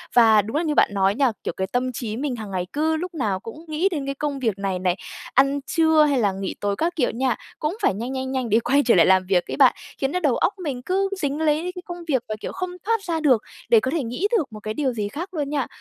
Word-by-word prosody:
Và 225 -3 +7
đúng 220 +5 -6
là 330 - +1
như 305 -3 -1
bạn - - +5
nói 195 0 +2
nha, 270 -1 +3
kiểu, - - -2
cái 190 - -1
tâm 250 +4 -1
trí 225 -3 -4
mình 270 -1 -2
hằng 215 -4 -7
ngày 180 -2 -2
cứ 315 +2 +1
lúc 360 +3 -5
nào 215 - -1
cũng 300 - -10
nghĩ 315 +5 +1
đến 295 -5 -3
cái 275 0 -3
công 285 -1 -3
việc 225 -6 0
này 195 -2 -1
này, 180 -1 +1 0.4
ăn 275 +2 +3
trưa 320 -2 +4
hay 285 -3 +2
là 205 -4 +2
nghỉ 190 0 -4
tối 205 -1 0
các 335 - -1
kiểu 265 -6 +1
nha, 250 0 0 0.2
cũng 305 +7 -2
phải - - +3
nhanh, 235 +6 -4
nhanh, 260 0 -3
nhanh 260 -3 -2
để 220 +2 +4
quay 275 +5 +2
trở 235 - +5
lại 170 - +6
làm 190 0 +4
việc 180 -2 +1
ấy - - -3
bạn, 265 -3 +6 0.2
khiến 270 0 -1
nó 360 - 0
đầu 290 -8 +2
óc 405 - +1
mình 270 -6 -3
cứ 385 +7 0
dính 285 +1 -1
lấy 310 -1 +2
đấy 360 - -3
cái 360 - -6
công 350 -1 -6
việc 260 -6 +1
và, 215 - -2
kiểu, - - -4
không 365 -1 -4 0.2
thoát 455 -1 +1
ra 335 -4 -1
được 265 -8 +4 0.3
để 230 - +7
có 260 +4 -2
thể 315 -2 0
nghĩ 250 - -1
được 285 - -3
một 215 - -7
cái 215 0 -4
điều 265 0 0
gì 210 -3 -2
khác 340 - -6
luôn 295 -4 -2
nha. 285 -3 -1
265 Hz, 290 wpm, -23 LUFS, 220-310 Hz, 0.4 s, Và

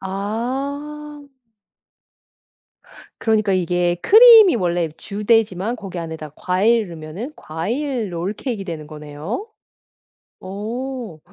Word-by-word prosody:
아. 275 +9 -4 2.0
그러니까 215 -3 +2
이게 175 -1 +1
크림이 440 - +8
원래 175 -3 0
이렇게 155 -1 -6
주되지만 210 0 0
거기 195 -5 -7
안에다 160 -2 -6
과일 210 +3 +2
넣으면 170 - -7
과일 225 - -3
롤케이크가 200 +5 -3
되는 160 -4 -6
거네요. 150 - -6 0.9
어. 220 0 -5
205 Hz, 220 characters per minute, -20 LUFS, 175-250 Hz, 2.0 s, 크림이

